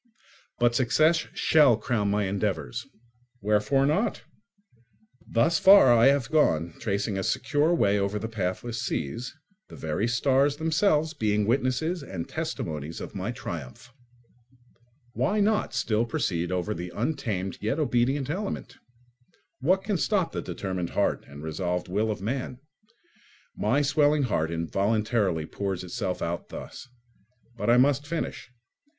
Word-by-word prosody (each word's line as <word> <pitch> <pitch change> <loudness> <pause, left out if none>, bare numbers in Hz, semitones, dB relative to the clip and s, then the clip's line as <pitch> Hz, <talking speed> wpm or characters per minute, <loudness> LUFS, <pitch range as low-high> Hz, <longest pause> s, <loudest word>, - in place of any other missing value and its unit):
But 120 0 +3
success 155 +7 +3
shall 145 -8 +5
crown 110 -3 -1
my 105 0 +1
endeavours. 95 -10 -2 0.5
Wherefore 105 +6 +2
not? 175 +11 0 1.0
Thus 120 +9 +2
far 190 -10 +8
I 115 +2 +6
have 135 -3 +2
gone, 85 - +2
tracing 100 -1 -1
a - - -2
secure 150 - +1
way 105 -8 +2
over 100 +1 -1
the 110 +2 -4
pathless 110 +2 -3
seas, 115 - -3 0.3
the - - -11
very 80 +8 -2
stars 135 +4 +2
themselves 160 0 +1
being 105 -6 0
witnesses 135 - 0
and 95 -11 -6
testimonies 75 +1 -4
of - - -7
my 100 +2 -4
triumph. 110 - -8 1.2
Why 210 +2 0
not 210 +1 +1
still 110 +1 0
proceed 90 -6 -1
over 90 +3 -1
the 90 -2 -6
untamed 110 - -2
yet 110 +7 -1
obedient 135 -2 +1
element? 195 +6 -4 0.8
What 185 +8 +2
can 200 -1 0
stop 195 -5 +1
the - - -3
determined 95 -3 -4
heart - - 0
and 70 +1 -11
resolved 90 +3 -2
will 105 +4 0
of 105 -3 -4
man? 125 +2 -3 1.0
My 135 +8 +1
swelling 145 +1 +3
heart 80 -10 0
involuntarily 100 +1 0
pours 95 +1 -4
itself 90 0 -3
out 85 +1 -4
thus. - - -9 0.7
But 120 - -2
I 120 - +6
must 140 +2 +3
finish. 165 -5 -4
115 Hz, 135 wpm, -27 LUFS, 95-145 Hz, 1.2 s, far